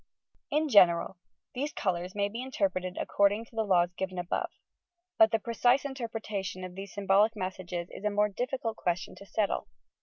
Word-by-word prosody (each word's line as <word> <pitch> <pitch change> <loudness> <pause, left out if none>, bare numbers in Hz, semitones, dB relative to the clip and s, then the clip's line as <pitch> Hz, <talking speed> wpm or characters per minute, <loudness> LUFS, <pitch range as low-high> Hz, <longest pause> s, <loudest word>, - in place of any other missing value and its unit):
In 305 +1 +1
general: 185 - +5 0.3
these 285 +4 -2
colours 180 -1 -2
may 200 -1 +1
be 230 +4 -5
interpreted 190 -8 -1
accord 200 0 +3
ing 220 +2 -5
to 230 - -21
the 225 - +1
laws 180 -4 +3
given 185 0 -4
above, 175 -1 -1 0.7
but 220 - +8
the 225 - +2
precise 245 +4 +2
interpreta 225 -7 -4
tion 185 -1 -5
of 185 -1 -6
these 195 +1 -8
symbolic 205 +2 +3
messages 185 -3 -4
is - - -9
a 210 - +2
more 210 0 +2
difficult 235 +1 -3
ques 175 0 0
tion - - -9
to 200 - -12
settle. 210 0 -1
200 Hz, 185 wpm, -30 LUFS, 185-225 Hz, 0.7 s, but